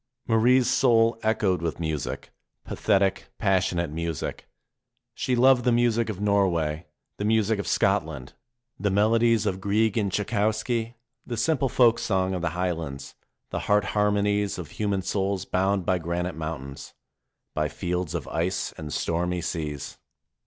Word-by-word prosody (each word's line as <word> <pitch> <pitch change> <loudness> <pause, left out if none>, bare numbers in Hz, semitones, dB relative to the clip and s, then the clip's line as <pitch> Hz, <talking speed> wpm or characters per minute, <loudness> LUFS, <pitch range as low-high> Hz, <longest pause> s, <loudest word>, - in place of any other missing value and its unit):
Marie's 120 +2 +4
soul 115 -3 +3
echoed 105 -5 +1
with 85 -1 -3
music, 80 -5 -4 0.3
pathetic, 95 -1 +1
passionate 95 -5 +1
music. 85 0 -4 0.7
She 125 - -1
loved 125 0 +5
the 125 - +3
music 115 -1 +2
of 100 -4 -4
Norway, 90 -6 +1 0.3
the - - -4
music 110 0 +2
of 100 - -4
Scotland, 65 -5 0 0.5
the 105 - +1
melodies 110 +2 +3
of 95 -2 -1
Grieg 105 +2 +1
and 100 -2 -1
Tschaikowsky, 110 +3 -1 0.3
the 120 - -4
simple 135 +1 +1
folk 120 -1 +4
song 95 -2 0
of 90 - -2
the 85 - 0
Highlands, 80 -7 -3 0.4
the - - -2
heart 105 0 +4
harmonies 105 -1 +1
of 85 -4 -7
human 100 -3 -1
souls 95 -1 -1
bound 95 0 0
by 90 0 +1
granite 85 +2 -2
mountains, 75 -4 -7 0.6
by 75 0 0
fields 90 +2 -3
of 80 - -4
ice 85 +3 -1
and 75 -1 -6
stormy 90 +3 -1
seas. 75 -4 -4
95 Hz, 140 wpm, -26 LUFS, 85-110 Hz, 0.7 s, loved